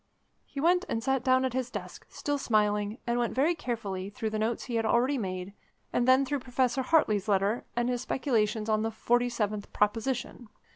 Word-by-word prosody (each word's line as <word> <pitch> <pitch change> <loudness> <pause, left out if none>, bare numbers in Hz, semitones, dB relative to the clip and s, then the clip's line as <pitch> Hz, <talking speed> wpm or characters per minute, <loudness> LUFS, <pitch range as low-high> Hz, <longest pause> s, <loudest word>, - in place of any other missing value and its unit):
He 280 - -7
went 355 +4 +3
and 225 - -2
sat 265 -1 +1
down 260 0 +3
at 260 - -2
his 255 -1 -1
desk, - - -8
still 290 -1 -2
smiling, 210 -2 +1
and 240 0 0
went 240 - -1
very 295 +7 +3
carefully 210 - -4
through 220 +1 -4
the 215 - -2
notes 225 +2 -1
he 245 - -6
had 225 - +1
already 255 +4 +2
made, 185 -1 -4 0.4
and 245 - +1
then 260 +1 +5
through 285 +2 -1
Professor 255 0 0
Hartley's 225 -8 +2
letter, 200 +3 +1
and 240 0 +1
his 245 -1 -1
speculations 225 -5 0
on 215 -1 +2
the 225 - 0
Forty 240 +2 +1
Seventh 210 -3 -3
Proposition. 235 +2 -1
240 Hz, 195 wpm, -29 LUFS, 215-260 Hz, 0.4 s, then